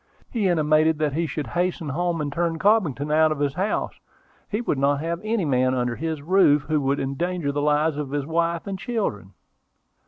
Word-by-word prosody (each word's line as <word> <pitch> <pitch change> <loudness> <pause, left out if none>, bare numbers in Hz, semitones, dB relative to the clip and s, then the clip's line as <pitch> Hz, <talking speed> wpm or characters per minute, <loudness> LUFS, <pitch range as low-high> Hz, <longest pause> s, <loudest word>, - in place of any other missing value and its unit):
He 220 -5 0
intimated 155 -2 +3
that 150 -2 0
he 165 +2 0
should 150 -1 -4
hasten 175 -3 -2
home 170 +3 -1
and 145 -1 -3
turn 165 +1 -1
Cobbington 165 - +1
out 155 0 +4
of 155 - -1
his 140 -1 0
house: 195 +5 -2 0.5
he 210 - -1
would 190 - -1
not 140 +1 +2
have 165 +3 -3
any 215 -4 0
man 130 -2 +2
under 125 -1 -1
his 160 -1 -4
roof 155 -4 +4
who 155 -1 0
would 140 +1 0
endanger 155 +3 -2
the 145 +1 -2
lives 150 +1 +2
of 150 -2 -3
his 145 0 -2
wife 165 +1 -1
and 195 -1 -5
children." 110 - -3
155 Hz, 195 wpm, -24 LUFS, 145-175 Hz, 0.5 s, out